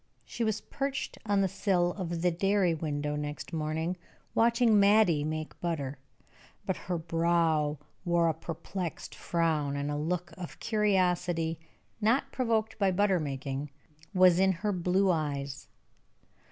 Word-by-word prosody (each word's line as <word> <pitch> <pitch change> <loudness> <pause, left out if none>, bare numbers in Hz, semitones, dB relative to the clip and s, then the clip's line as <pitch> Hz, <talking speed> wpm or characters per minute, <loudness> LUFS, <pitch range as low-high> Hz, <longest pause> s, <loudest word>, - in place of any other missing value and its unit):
She 235 - -3
was 220 -1 0
perched 275 -1 -4
on 200 -1 +3
the 195 - +3
sill 175 -2 +1
of 170 -3 -4
the 180 - +4
dairy 195 0 +2
window, 150 -2 -2
next 150 +1 -5
morning, 160 +3 -2 0.4
watching 230 -1 +4
Mattie 200 -7 +5
make 155 0 -4
butter, 145 -5 -3 0.7
but - - 0
her 180 -1 -3
brow 165 -2 +1 0.3
wore 170 -2 +2
a 165 - +2
perplexed 165 +2 -5
frown, 155 -4 0
and 140 +1 -2
a - - -1
look 170 +3 -2
of 175 - -8
curiosity 180 -6 +1 0.4
not 255 +6 +2
provoked 225 -3 0
by 195 -2 +3
butter 190 0 +2
making 140 -1 -4 0.4
was 185 -3 +5
in 190 0 +5
her 210 - +3
blue 185 +1 +2
eyes. 140 -4 -3
175 Hz, 140 wpm, -30 LUFS, 155-195 Hz, 0.7 s, Mattie